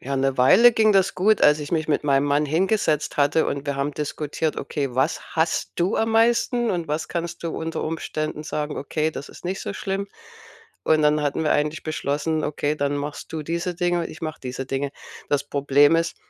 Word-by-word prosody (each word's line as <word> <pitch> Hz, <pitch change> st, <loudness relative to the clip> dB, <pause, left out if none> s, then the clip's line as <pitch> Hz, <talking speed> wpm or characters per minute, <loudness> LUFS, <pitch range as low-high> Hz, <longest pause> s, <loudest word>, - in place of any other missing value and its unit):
ja, 140 Hz, +1 st, -3 dB
'ne 135 Hz, 0 st, +1 dB
Weile 230 Hz, -, +7 dB
ging 220 Hz, -1 st, +4 dB
das 195 Hz, 0 st, +3 dB
gut, 210 Hz, +3 st, +3 dB
als 150 Hz, +1 st, +5 dB
ich 150 Hz, +2 st, -6 dB
mich 155 Hz, -2 st, 0 dB
mit 150 Hz, -, +1 dB
meinem 140 Hz, 0 st, +3 dB
Mann 145 Hz, +1 st, +2 dB
hingesetzt 160 Hz, -1 st, 0 dB
hatte 145 Hz, +2 st, +3 dB
und 140 Hz, +1 st, -3 dB
wir 140 Hz, -, -2 dB
haben 140 Hz, +1 st, -1 dB
diskutiert: 150 Hz, +1 st, -3 dB
„Okay, 140 Hz, -5 st, -3 dB
was 135 Hz, +5 st, +1 dB
hasst 160 Hz, 0 st, 0 dB
du 180 Hz, +5 st, +1 dB
am 225 Hz, 0 st, +1 dB
meisten 235 Hz, +1 st, +2 dB
und 170 Hz, -3 st, -2 dB
was 155 Hz, +1 st, -2 dB
kannst 170 Hz, 0 st, -4 dB
du 165 Hz, -, -2 dB
unter 160 Hz, 0 st, -3 dB
Umständen 155 Hz, -1 st, -3 dB
sagen, 150 Hz, 0 st, -3 dB
okay, 155 Hz, +3 st, -1 dB
das 140 Hz, -, -8 dB
ist -, -, -14 dB
nicht 190 Hz, +2 st, -3 dB
so -, -, -4 dB
schlimm.“ 195 Hz, 0 st, -3 dB, 0.8 s
Und 155 Hz, -1 st, +3 dB
dann 150 Hz, 0 st, +3 dB
hatten 145 Hz, +2 st, -1 dB
wir 155 Hz, -, +2 dB
eigentlich 150 Hz, +1 st, 0 dB
beschlossen: 155 Hz, +1 st, -1 dB
„Okay, 150 Hz, 0 st, -1 dB
dann 145 Hz, 0 st, -1 dB
machst 145 Hz, +2 st, -6 dB
du 155 Hz, -1 st, -3 dB
diese 170 Hz, +3 st, -3 dB
Dinge 175 Hz, 0 st, 0 dB
und 165 Hz, -, -3 dB
ich 155 Hz, -, -11 dB
mache 155 Hz, -2 st, -5 dB
diese 130 Hz, +1 st, -5 dB
Dinge.“ 135 Hz, +1 st, -2 dB, 0.4 s
Das 145 Hz, -1 st, +1 dB
Problem 145 Hz, +2 st, +4 dB
ist, 165 Hz, 0 st, -1 dB
155 Hz, 210 wpm, -23 LUFS, 145-170 Hz, 0.8 s, Weile